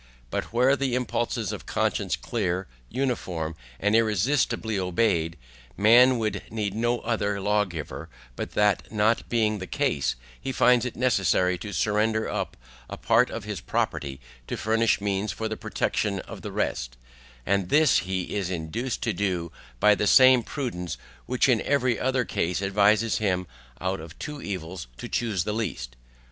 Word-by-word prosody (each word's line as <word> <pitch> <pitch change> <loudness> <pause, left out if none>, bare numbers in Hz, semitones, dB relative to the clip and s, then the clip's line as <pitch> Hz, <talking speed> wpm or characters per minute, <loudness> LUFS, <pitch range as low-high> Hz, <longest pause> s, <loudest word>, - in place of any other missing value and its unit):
For - - -1
were 125 +4 +4
the 135 -3 -1
impulses 120 -3 -1
of - - -7
conscience - - 0
clear, 90 +1 -2 0.2
uniform, 95 -11 -2 0.2
and 105 +2 +2
irresistibly 110 0 +1
obeyed, 90 -3 +1 0.4
man 120 +5 +6
would 110 -2 -1
need 105 -3 -2
no 120 +2 0
other 105 -3 -1
lawgiver; 95 -6 -2 0.3
but - - -5
that 105 -3 +2
not 110 +1 +1
being 110 -3 +1
the 95 - -6
case, 70 -3 0 0.3
he 135 - -3
finds 125 -1 +4
it 125 - -4
necessary 95 -7 +2
to 105 +4 -6
surrender 110 +4 +1
up - - -3 0.3
a - - -6
part - - +3
of - - -5
his - - -5
property 65 -1 -2 0.3
to - - -3
furnish 115 +1 +2
means 100 +1 -1
for 110 - -3
the 110 - -3
protection 100 -2 -1
of - - -10
the - - -6
rest; - - -2 0.5
and 100 -2 +1
this 150 -3 +5
he 95 -1 -3
is 100 -3 -1
induced 95 +9 -3
to - - 0
do 90 -5 -1 0.3
by 105 - +6
the 105 0 0
same 130 0 +7
prudence 100 - -4 0.3
which 125 +1 +2
in 125 -4 +3
every 130 -5 +1
other 130 -1 +1
case 90 -2 -1
advises 100 +1 +3
him 90 -4 0 0.3
out 95 0 -2
of 80 +1 -10
two 150 -2 -6
evils 90 -4 -5
to - - -6
choose 105 -7 -1
the 105 - -2
least. 90 - -4
105 Hz, 160 wpm, -26 LUFS, 95-120 Hz, 0.5 s, same